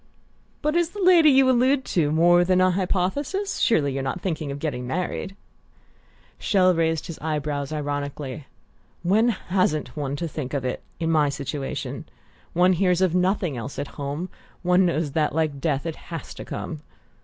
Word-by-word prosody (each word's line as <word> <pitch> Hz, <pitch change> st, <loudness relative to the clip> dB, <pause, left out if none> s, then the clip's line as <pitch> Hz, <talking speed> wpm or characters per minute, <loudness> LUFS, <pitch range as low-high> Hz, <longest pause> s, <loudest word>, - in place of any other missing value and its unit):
"But 300 Hz, +2 st, +1 dB
is 345 Hz, -1 st, +2 dB
the 410 Hz, -, -9 dB
lady 345 Hz, -4 st, +7 dB
you 270 Hz, -1 st, +5 dB
allude 260 Hz, +2 st, +3 dB
to 155 Hz, -4 st, +2 dB
more 175 Hz, +3 st, +5 dB
than 185 Hz, +1 st, +2 dB
a 185 Hz, 0 st, +4 dB
hypothesis? 200 Hz, -, -1 dB
Surely 145 Hz, -11 st, +2 dB
you're 135 Hz, -, -2 dB
not 135 Hz, +7 st, -3 dB
thinking 160 Hz, -5 st, -3 dB
of 140 Hz, -, -4 dB
getting 130 Hz, -5 st, -3 dB
married?" 180 Hz, +5 st, -3 dB, 1.0 s
Chelles 185 Hz, -4 st, +3 dB
raised 160 Hz, -1 st, 0 dB
his 170 Hz, -3 st, -7 dB
eye 155 Hz, 0 st, -1 dB
brows 145 Hz, -1 st, -3 dB
ironically. 145 Hz, -2 st, -4 dB, 0.6 s
"When 215 Hz, +7 st, +3 dB
hasn't 165 Hz, -, -1 dB
one 140 Hz, -2 st, -2 dB
to 170 Hz, +4 st, -3 dB
think 145 Hz, -3 st, -5 dB
of 135 Hz, -2 st, -2 dB
it, 125 Hz, -, -2 dB, 0.2 s
in 165 Hz, -1 st, 0 dB
my 150 Hz, -2 st, +3 dB
situation? 140 Hz, 0 st, -4 dB, 0.5 s
One 180 Hz, +2 st, +4 dB
hears 180 Hz, 0 st, +2 dB
of 185 Hz, -3 st, +3 dB
nothing 180 Hz, -4 st, +1 dB
else 125 Hz, +3 st, -6 dB
at 145 Hz, -, -4 dB
home 145 Hz, +5 st, -5 dB, 0.3 s
one 180 Hz, +1 st, +4 dB
knows 160 Hz, -3 st, -1 dB
that, 150 Hz, 0 st, 0 dB
like 155 Hz, -4 st, 0 dB
death, 145 Hz, -1 st, 0 dB
it 165 Hz, -2 st, -4 dB
has 165 Hz, -2 st, -6 dB
to -, -, -9 dB
come." 155 Hz, -3 st, -6 dB
165 Hz, 175 wpm, -24 LUFS, 145-185 Hz, 1.0 s, lady